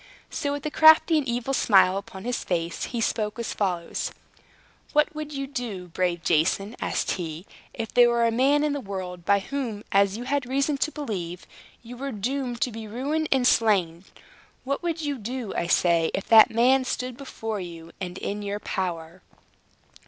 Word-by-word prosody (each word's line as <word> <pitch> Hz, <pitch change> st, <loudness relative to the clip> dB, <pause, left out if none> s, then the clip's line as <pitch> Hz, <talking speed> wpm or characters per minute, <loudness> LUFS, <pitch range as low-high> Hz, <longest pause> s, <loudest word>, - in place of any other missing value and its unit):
So, 290 Hz, -3 st, -2 dB
with 285 Hz, 0 st, -5 dB
a 305 Hz, -, -2 dB
crafty 315 Hz, +1 st, +6 dB
and 280 Hz, -, -4 dB
evil 245 Hz, +2 st, -2 dB
smile 195 Hz, -6 st, +4 dB
upon 195 Hz, -1 st, -7 dB
his 245 Hz, +1 st, -2 dB
face, 170 Hz, -1 st, -2 dB
he 235 Hz, -2 st, -4 dB
spoke 215 Hz, -1 st, -1 dB
as 235 Hz, -, -3 dB
follows: 180 Hz, -4 st, -2 dB, 0.8 s
"What 300 Hz, +1 st, +3 dB
would 305 Hz, -1 st, -6 dB
you 275 Hz, -1 st, -3 dB
do, 225 Hz, -9 st, -5 dB
brave 175 Hz, 0 st, -1 dB
Jason," 185 Hz, +8 st, +1 dB
asked -, -, -1 dB
he, 165 Hz, -1 st, -5 dB, 0.3 s
"if 225 Hz, -1 st, -6 dB
there 245 Hz, -1 st, +6 dB
were 235 Hz, 0 st, +2 dB
a 230 Hz, -, +2 dB
man 275 Hz, +5 st, +3 dB
in 300 Hz, -1 st, +1 dB
the 285 Hz, -, -3 dB
world, 185 Hz, -4 st, -6 dB
by 200 Hz, +1 st, +4 dB
whom, 235 Hz, -4 st, -4 dB
as 200 Hz, +1 st, +3 dB
you 240 Hz, -, -5 dB
had 270 Hz, 0 st, -1 dB
reason 275 Hz, +2 st, 0 dB
to 310 Hz, -, 0 dB
believe, 185 Hz, -, -5 dB, 0.4 s
you 245 Hz, +1 st, -10 dB
were 275 Hz, +2 st, -4 dB
doomed 245 Hz, +3 st, -3 dB
to 260 Hz, -4 st, +1 dB
be 220 Hz, 0 st, -7 dB
ruined 285 Hz, +8 st, -2 dB
and 265 Hz, -2 st, +3 dB
slain 195 Hz, -8 st, +2 dB, 0.6 s
what 280 Hz, +1 st, -2 dB
would 335 Hz, -2 st, -2 dB
you 290 Hz, -3 st, -3 dB
do, 235 Hz, 0 st, -5 dB
I 170 Hz, -, -1 dB
say, 170 Hz, -2 st, +3 dB
if 195 Hz, -, -4 dB
that 220 Hz, -2 st, +8 dB
man 255 Hz, +4 st, +3 dB
stood 255 Hz, 0 st, -3 dB
before 225 Hz, -5 st, -5 dB
you, 170 Hz, -2 st, -8 dB
and 180 Hz, -1 st, -5 dB
in 205 Hz, +1 st, -4 dB
your 205 Hz, 0 st, -3 dB
power?" 175 Hz, -3 st, -4 dB
225 Hz, 185 wpm, -25 LUFS, 190-270 Hz, 0.8 s, that